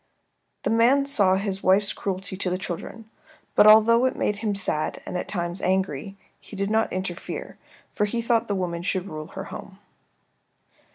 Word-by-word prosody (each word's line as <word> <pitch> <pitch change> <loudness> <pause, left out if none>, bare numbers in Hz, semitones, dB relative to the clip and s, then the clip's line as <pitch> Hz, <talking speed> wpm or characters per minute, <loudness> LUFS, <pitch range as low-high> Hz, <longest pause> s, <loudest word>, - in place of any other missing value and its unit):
The - - 0
man 245 +5 +4
saw 200 -9 +4
his 195 0 -2
wife's 195 +2 +3
cruelty 190 0 -4
to 185 -1 -2
the 180 - -1
children, 190 +5 -7 0.5
but 210 - +6
although 225 +3 +7
it 260 - 0
made 210 - -1
him 210 -1 -2
sad, 170 -6 0
and - - -6
at 180 - -3
times 175 -1 -3
angry, 190 -1 -1 0.2
he - - -12
did 200 +1 -2
not 220 0 +1
interfere, 185 -1 -5 0.3
for 210 - +1
he 235 +3 -3
thought 230 0 +1
the 205 - -1
woman 175 -3 -3
should 185 +1 -1
rule 155 -2 -7
her 190 +3 -7
home. 195 0 -10
195 Hz, 175 wpm, -24 LUFS, 185-220 Hz, 0.5 s, although